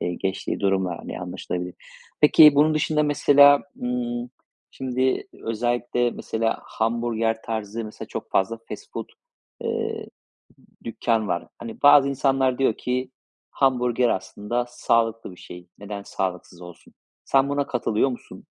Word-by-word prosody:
eee, 90 - -2
geçtiği 95 +2 -3
durumlar, 95 -3 0
hani, - - -7
anlaşılabilir. 90 0 -5 0.5
Peki, 150 0 +8
bunun 155 +2 +4
dışında 155 0 +1
mesela, 145 -1 +6 0.2
ımm, 120 0 -3 0.4
şimdi 130 0 -1
özellikle, 120 +1 -1
mesela, 115 0 -2
hamburger 115 0 -1
tarzı, 110 0 -4
mesela, 110 - -9
çok - - -7
fazla 115 +4 +1
fast - - -9
food, - - -5 0.5
eee, - - -3 0.8
dükkân 115 -2 -1
var. 85 -1 -2
Hani, 115 -1 -9
bazı 145 -1 +7
insanlar 135 -1 +1
diyor 130 -5 +2
ki: 125 +1 -2 0.4
"Hamburger 125 -2 +2
aslında 105 +5 -2
sağlıklı 115 -3 0
bir 90 - -14
şey. 90 0 -11
Neden 100 0 -7
sağlıksız 90 -2 -4
olsun?" 90 -1 -14 0.3
Sen 135 0 +3
buna 145 0 0
katılıyor 120 0 0
musun? 125 - -9
120 Hz, 130 wpm, -24 LUFS, 105-130 Hz, 0.8 s, Peki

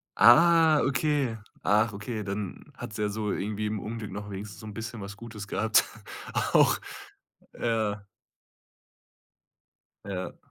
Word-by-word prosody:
Ah, 160 - +7
okay. 135 -3 +1 0.3
Ach, 110 +2 +3
okay, 105 +2 -4
dann 100 -1 -5
hat's 110 -3 -7
ja 105 -1 0
so 105 0 -2
irgendwie 105 +1 -2
im 105 0 -2
Unglück 110 -1 -6
noch 105 +1 -6
wenigstens 100 +1 -7
so - - -10
'n 105 - -7
bisschen 115 0 -6
was 100 +1 -8
Gutes 105 -2 -8
gehabt, 110 +2 +3 0.5
auch. - - +3 0.8
Ja. 110 -3 -1 2.0
Ja. 95 -2 -5
105 Hz, 125 wpm, -28 LUFS, 105-115 Hz, 2.0 s, Ah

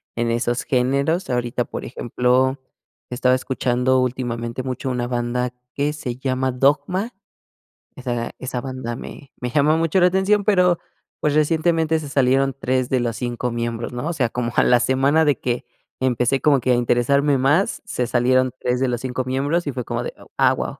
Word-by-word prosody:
en 115 0 0
esos 120 +1 0
géneros, 140 +8 0
ahorita, 120 0 -1
por - - -6
ejemplo, 130 +2 +1 0.5
estaba 125 +1 +2
escuchando 130 0 +1
últimamente 120 -1 -3
mucho 130 0 -3
una 125 -1 -1
banda 120 0 -1 0.2
que 145 +1 0
se 130 -5 -5
llama 130 0 -1
Dogma. 145 - +1 0.8
Esa 120 -2 -3
esa 125 -1 -4
banda 130 -3 -5
me 135 +2 -10
me 125 - -2
llamó 150 +4 +3
mucho 165 +3 +2
la 180 - +6
atención, 190 +2 +2
pero, 180 -4 +3 0.4
pues, 150 - +1
recientemente 160 +1 +2
se 150 - -7
salieron 135 0 +2
3 130 -2 0
de 130 -2 +1
los 120 -1 -2
5 125 0 -3
miembros, 115 0 -3
¿no? 125 +4 -4
O 170 - -1
sea, 130 -7 0
como 120 0 -3
a - - +4
la 125 - +5
semana 135 +6 +3
de 145 -2 +2
que 120 -1 -2 0.3
empecé 130 +1 +1
como 140 -3 +3
que 130 - +1
a - - +5
interesarme 135 +4 +2
más, 145 - +2
se 125 - -2
salieron 130 +1 +2
3 125 0 0
de 130 - +1
los 120 -1 -2
5 130 0 -3
miembros 145 +6 0
y 145 - -2
fue 125 - -3
como - - -3
de, - - -5 0.2
ah, - - +4
guau. - - -4
130 Hz, 180 wpm, -21 LUFS, 125-145 Hz, 0.8 s, la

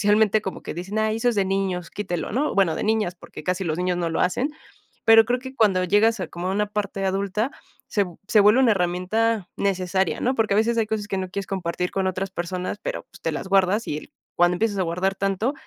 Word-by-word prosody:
socialmente 210 0 +3
como 190 - -5
que - - -5
dicen: 190 +5 -4
"Ay, 220 0 +1
eso 235 +2 +1
es 235 - +1
de 200 - +3
niños, 190 -2 -1
quítelo", 185 -4 -3
¿no?, 280 +7 0
bueno, 185 -5 +3
de - - -3
niñas, 215 -4 +1
porque - - -11
casi 185 +1 -1
los 160 0 -2
niños 180 0 0
no 170 -1 -1
lo 160 - -1
hacen, 245 +11 +1 0.5
pero 225 0 +8
creo 245 +2 0
que 260 0 -9
cuando 195 -4 +3
llegas 210 +3 +3
a 175 - -3
como 175 +2 -4
a - - 0
una 210 +1 +1
parte 200 -1 -3
adulta, 200 +5 0 0.4
se 205 - +1
v 175 -3 -11
se 215 - +4
vuelve 210 +5 +6
una 255 -4 +5
herramienta 190 +3 0
necesaria, 190 -1 0
¿no?, 255 +2 +1
porque 220 -3 +2
a - - +2
veces 230 +1 +2
hay 220 - +2
cosas 210 -1 -3
que 195 - -1
no 185 -1 -3
quieres 200 0 -4
compartir 180 -1 -2
con 190 -1 0
otras 185 +1 -3
personas, 180 +2 -4
pero, - - -3
pues, - - -18
te 165 - -1
las 170 +5 -5
guardas 195 +3 +3
y 150 - -2
el - - -13 0.2
cuando 175 +1 +4
empiezas 210 0 0
a - - +2
guardar 180 +3 0
tanto, 195 +7 0
195 Hz, 245 wpm, -24 LUFS, 180-215 Hz, 0.5 s, pero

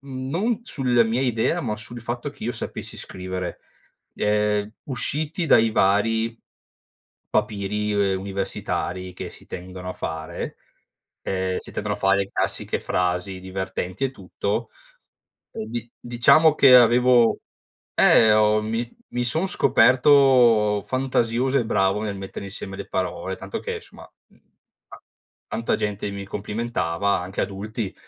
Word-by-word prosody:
non 140 - -2
sulla 125 - +2
mia 115 +3 0
idea, 115 -4 +1
ma 105 - -2
sul 120 +3 -9
fatto 120 +4 -4
che 140 - -10
io 120 - -1
sapessi - - -6
scrivere, 90 -1 -5 0.5
ehm, 105 0 0
usciti 150 +6 -2
dai 115 -5 +5
vari 110 +3 +2 0.9
papiri, 105 +1 -1 0.2
ehm, 95 - -1
universitari 95 -2 -3
che - - -6
si - - -14
tendono 90 0 -8
a - - -4
fare, 80 -1 -5 0.7
ehm, 95 -1 -1
si - - -10
tendono 105 0 -2
a 105 - -9
fare 95 0 +2
classiche - - -2
frasi 90 +1 -1
divertenti 95 +3 -4
e 135 - 0
tutto, 105 0 -4 0.8
e 110 - -5
di 120 0 -5
diciamo 120 +7 +5
che 130 -2 +8
avevo 120 0 +5 0.6
eh, 110 -1 +6
ho 105 0 +4
mi 115 +2 -2 0.2
mi 125 0 0
son 160 +10 0
scoperto 125 - +5
fantasioso 130 0 +1
e 115 - -1
bravo 95 -1 +1
nel 105 -2 -3
mettere 95 0 -7
insieme 95 -1 -7
le - - -7
parole, 95 0 -3
tanto 95 +1 -6
che, - - -4
insomma, - - -12 0.2
mhmm, - - -27 0.5
ta - - -12 0.5
tanta 115 - -1
gente 105 -1 -3
mi 100 0 -6
complimentava, 100 -3 -1
anche 90 +2 -4
adulti, 105 +1 -4
105 Hz, 135 wpm, -23 LUFS, 95-120 Hz, 0.9 s, che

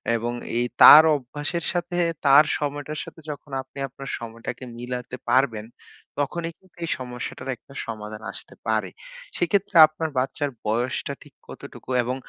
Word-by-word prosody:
এবং 120 +1 -2 0.2
এই 120 - +2 0.2
তার 155 +1 +12
অভ্যাসের 145 +6 -4
সাথে 175 0 -2 0.3
তার 140 +2 +8
সময়টার 145 +1 -4
সাথে 160 - -12
যখন 145 0 -10
আপনি 130 +1 -18
আপনার 135 +1 -9
সময়টাকে 115 +2 -7
মিলাতে 125 +1 -5
পারবেন, 115 -5 +2 0.5
তখনই 165 +4 -2
কিন্তু 185 -2 -28
এই 165 - -3
সমস্যাটার 125 +1 -6
একটা 135 - -18
সমাধান 110 -1 -7
আসতে - - -10
পারে। - - 0 0.5
সেক্ষেত্রে 190 +2 0
আপনার 155 +1 -4
বাচ্চার 135 +3 -1 0.2
বয়সটা 120 +4 -1
ঠিক - - -19
কতটুকু? - - -11
এবং 125 +2 -2
135 Hz, 140 wpm, -24 LUFS, 120-155 Hz, 0.5 s, তার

